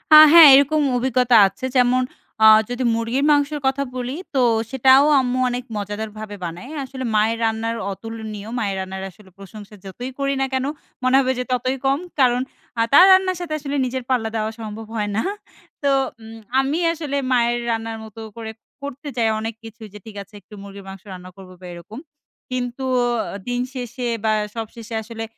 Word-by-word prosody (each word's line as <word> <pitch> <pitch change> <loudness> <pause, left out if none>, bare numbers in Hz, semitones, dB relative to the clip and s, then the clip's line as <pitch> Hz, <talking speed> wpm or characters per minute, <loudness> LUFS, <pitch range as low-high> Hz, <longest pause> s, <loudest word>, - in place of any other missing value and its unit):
আ - - +12 0.2
হ্যাঁ 335 -2 +11
এরকম 285 +3 +3 0.2
অভিজ্ঞতা 250 -1 +2
আছে। 195 +7 -7
যেমন, 250 0 +3 0.4
আ - - +8 0.2
যদি 245 +1 -3
মুরগির 230 +5 -1
মাংসের 290 +1 +1
কথা 270 +1 0
বলি, 250 +1 -4 0.2
তো 265 - +3 0.3
সেটাও 265 +2 +5
আম্মু 255 0 -1
অনেক 245 0 -3
মজাদারভাবে 210 +1 -6
বানায়। 175 - -7
আসলে 260 0 -7
মায়ের 220 +2 +2
রান্নার 225 +1 -1 0.2
অতুলনীয়। 220 0 -7
মায়ের 200 -4 -1
রান্নার 190 0 -5
আসলে 190 +1 -19
প্রশংসা 205 +2 -12
যতই 245 +7 -7
করি 275 0 0
না - - +2
কেনো, 260 +1 0 0.3
মনে 255 +1 +3
হবে 260 -1 +1
যে - - -1
ততই 255 +1 0
কম। 270 +1 +2 0.2
কারণ 250 -2 +3 0.4
আ - - +4
তার 355 +6 +9
রান্নার 375 -1 +4
সাথে 340 -3 -4
আসলে 285 0 -4
নিজের 255 0 -4
পাল্লা 240 -4 0
দেওয়া 220 0 -1
সম্ভব 220 0 -7
হয় 210 -2 -1
না। - - +2 0.6
তো 280 - +2 0.3
উ - - -12 0.3
আমি 275 +5 0
আসলে 300 -4 -4
মায়ের 240 -1 +2
রান্নার 225 0 -3
মত 220 -2 -13 0.2
করে 220 -1 -6 0.3
করতে 285 +1 -7
চাই 225 -2 +2
অনেক 225 +1 -4
কিছু 225 +1 -12
যে - - -9
ঠিক 220 -2 -11
আছে 200 +2 -29
একটু 215 - -19
মুরগির 200 0 -11
মাংস 195 -1 -9
রান্না 185 0 -9
করব 190 -1 -12
বা - - -11
এরকম। 175 +7 -10 0.5
কিন্তু 250 +1 -3 0.5
অ - - -5
দিন 245 0 -1
শেষে 245 -1 -5 0.2
বা 220 -1 +2 0.2
সব 225 -1 -3
শেষে 230 -1 -8
আসলে 225 +1 -7
240 Hz, 180 wpm, -21 LUFS, 215-265 Hz, 0.6 s, আ